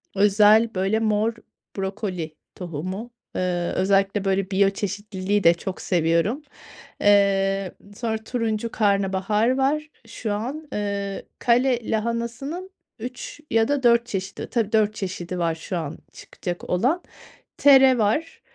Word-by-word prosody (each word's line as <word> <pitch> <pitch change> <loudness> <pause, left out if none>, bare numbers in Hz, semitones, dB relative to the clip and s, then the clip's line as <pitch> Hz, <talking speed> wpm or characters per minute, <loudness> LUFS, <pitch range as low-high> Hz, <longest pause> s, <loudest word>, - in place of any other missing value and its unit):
özel, 210 +3 +5
böyle, 195 +4 +1
mor 220 +1 +1 0.4
brokoli 190 -5 -4 0.2
tohumu. 185 +7 -5 0.2
Eee, 175 -1 -1
özellikle 195 +1 +2
böyle 195 0 0
biyoçeşitliliği 200 0 0
de 170 - +7
çok 185 +2 -6
seviyorum. 170 - +1 0.6
Eee, 195 -2 +3 0.2
sonra 225 0 -2
turuncu 230 -1 -2
karnabahar 205 +3 +1
var 300 +3 0 0.2
şu 215 -3 -4
an. 265 +9 -4
Eee, 200 -1 -3
kale 245 -1 +2
lahanasının 235 - -3 0.3
3 250 +5 -7
ya 225 0 +3
da 285 -2 0
4 235 -1 +5
çeşidi, 195 -2 -5
tabii, 225 -4 0
4 215 -1 +2
çeşidi 180 -2 -4
var 165 -1 0
şu 165 +3 -5
an 160 -1 -4 0.2
çıkacak 175 -1 -7
olan. 255 - +1 0.6
Tere 265 -2 +7
var, 230 +10 0
205 Hz, 120 wpm, -24 LUFS, 190-235 Hz, 0.6 s, de